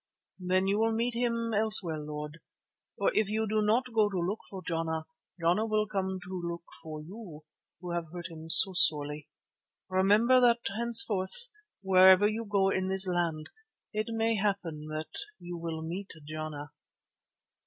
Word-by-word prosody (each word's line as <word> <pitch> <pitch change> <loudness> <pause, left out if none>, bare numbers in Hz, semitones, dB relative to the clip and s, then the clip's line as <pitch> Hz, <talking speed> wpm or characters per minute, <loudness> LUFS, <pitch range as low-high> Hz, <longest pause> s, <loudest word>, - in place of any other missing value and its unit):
"Then 185 +1 0
you 200 +2 0
will 225 0 +1
meet 235 +2 -1
him 230 -1 -2
elsewhere, 205 -7 +4
Lord. 150 +1 -7 0.6
For - - 0
if 215 -2 +1
you 220 +1 -1
do 215 +1 0
not 230 +4 0
go 215 -2 +3
to 195 - -4
look 180 +5 -2
for 190 -2 -9
Jana, 160 -1 -3 0.3
Jana 175 +7 +1
will 215 -1 0
come 190 -2 -3
to 185 0 -6
look 170 0 -5 0.2
for 155 -1 -8
you 175 -4 -11 0.4
who 180 0 -7
have 170 -2 -4
hurt 175 0 -8
him 160 0 -10
so 190 +3 +9
sorely. 150 -4 +2 0.6
Remember 210 +7 +3
that 240 -1 +3
henceforth, 230 - 0 0.3
wherever 190 +1 +6
you 220 +2 -3
go 200 -2 +1
in 190 -1 -1
all - - -3
this 190 0 +3
land, 170 -4 -2 0.4
it 215 0 -2
may 225 0 0
happen 185 -7 -3
that 155 0 -6 0.2
you 175 0 -8
will 165 -1 -5
meet 180 +5 -6 0.2
Jana." 155 -2 -7
190 Hz, 165 wpm, -29 LUFS, 165-215 Hz, 0.6 s, so